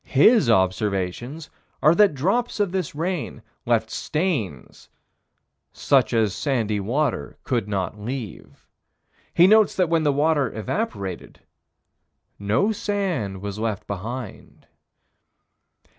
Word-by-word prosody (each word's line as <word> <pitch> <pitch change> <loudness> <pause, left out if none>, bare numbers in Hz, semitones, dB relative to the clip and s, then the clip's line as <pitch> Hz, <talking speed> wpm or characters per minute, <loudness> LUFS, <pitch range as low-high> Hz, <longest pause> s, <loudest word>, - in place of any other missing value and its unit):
His 210 - +4
observations 100 - 0 0.3
are 155 - +6
that 200 -4 +4
drops 200 - 0
of 205 -3 +1
this 185 -6 -3
rain 170 +1 -3 0.2
left - - +1
stains 140 - -3 0.8
"such 135 -5 +2
as 110 -4 +1
sandy 110 -3 -1
water 130 +10 -2
could 120 -5 -1
not 100 0 -3
leave." 120 -3 -7 0.7
He 175 - +7
notes 215 +2 +5
that 180 -3 +1
when 165 -1 +2
the 150 -2 +2
water 145 -2 +1
evaporated, 100 - -4 1.0
no 110 - +1
sand 175 - -2
was 100 0 -5
left 110 -3 -3
behind. 110 +3 -7
130 Hz, 110 wpm, -23 LUFS, 105-170 Hz, 1.0 s, He